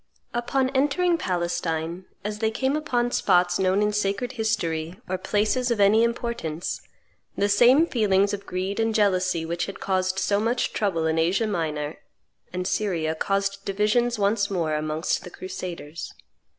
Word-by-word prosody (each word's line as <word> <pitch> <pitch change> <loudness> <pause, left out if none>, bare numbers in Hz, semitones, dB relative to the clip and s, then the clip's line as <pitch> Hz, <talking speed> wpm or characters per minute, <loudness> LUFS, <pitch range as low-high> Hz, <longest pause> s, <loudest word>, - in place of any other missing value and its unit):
Upon 260 +2 0
entering 295 +6 +2
Palestine, 175 - -2 0.2
as 210 +1 -4
they 220 0 +2
came 265 +5 0
upon 245 -6 0
spots 180 -4 +3
known 190 +2 +2
in 210 0 +1
sacred 210 +4 -1
history 180 -8 -2
or 185 0 -2
places 215 +6 +1
of 235 -3 0
any 205 +3 +5
importance, 235 -9 -2 0.6
the 200 - +2
same 245 +9 +6
feelings 205 - +2
of 200 -1 -5
greed 190 +3 -3
and 225 -1 +1
jealousy 185 -5 +2
which 170 +1 -2
had 195 - -7
caused 185 -1 0
so 200 +1 +1
much 235 +3 0
trouble 185 -7 0
in 160 0 +1
Asia 180 +7 +2
Minor 155 -7 -2 0.5
and 180 0 -3
Syria 175 -6 0
caused 195 +4 -1
divisions 215 +5 +1
once 200 0 +1
more 170 -5 -1
amongst 155 +2 -1
the - - -8
crusaders. 175 -4 -7
200 Hz, 150 wpm, -25 LUFS, 175-225 Hz, 0.6 s, same